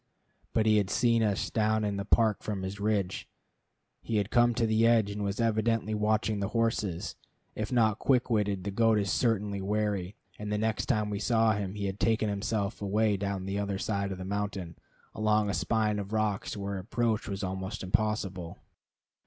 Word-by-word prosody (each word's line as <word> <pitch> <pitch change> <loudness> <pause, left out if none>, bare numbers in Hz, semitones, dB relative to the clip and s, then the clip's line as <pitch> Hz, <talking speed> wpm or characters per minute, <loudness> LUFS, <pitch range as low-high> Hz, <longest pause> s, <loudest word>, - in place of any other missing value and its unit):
But 110 - +2
he 110 -1 +5
had 100 -3 +1
seen 115 0 +3
us 105 -3 0
down 110 -1 +1
in 100 -1 -1
the 100 - -3
park 110 0 +3
from 100 -3 -4
his 95 +2 -5
ridge. 100 -3 -1 0.7
He 115 - -1
had 100 +1 -1
come 120 0 +4
to 115 - +2
the 110 +1 +3
edge, 110 -3 +3
and 105 0 -4
was 100 +1 -2
evidently 115 -1 +1
watching 105 0 +1
the 100 - -1
horses. 100 -6 -1 0.4
If 110 +2 -4
not 110 -4 +3
quick 130 -3 +2
witted, 105 -5 0
the 100 - -3
goat 115 +1 +3
is 100 -2 0
certainly 105 -4 0
wary; 100 -1 -1 0.2
and 105 0 -4
the 105 - +1
next 110 +1 -1
time 105 -1 +1
we 100 - -2
saw 115 0 +3
him 100 -2 -2
he 100 -1 -3
had 95 +1 -3
taken 110 -1 +2
himself 100 +1 -2
away 105 +1 +2
down 100 -1 -3
the 100 +1 -2
other 100 -1 -2
side 100 -1 -2
of 95 - -4
the 95 - -6
mountain, 100 -4 -3 0.4
along 105 -1 +2
a - - -3
spine 105 -2 +1
of 100 +1 -6
rocks 105 -1 -1
where 100 -1 -3
approach 115 +2 -1
was 100 0 -4
almost 95 +3 -4
impossible. 95 -3 -1
105 Hz, 195 wpm, -29 LUFS, 100-110 Hz, 0.7 s, he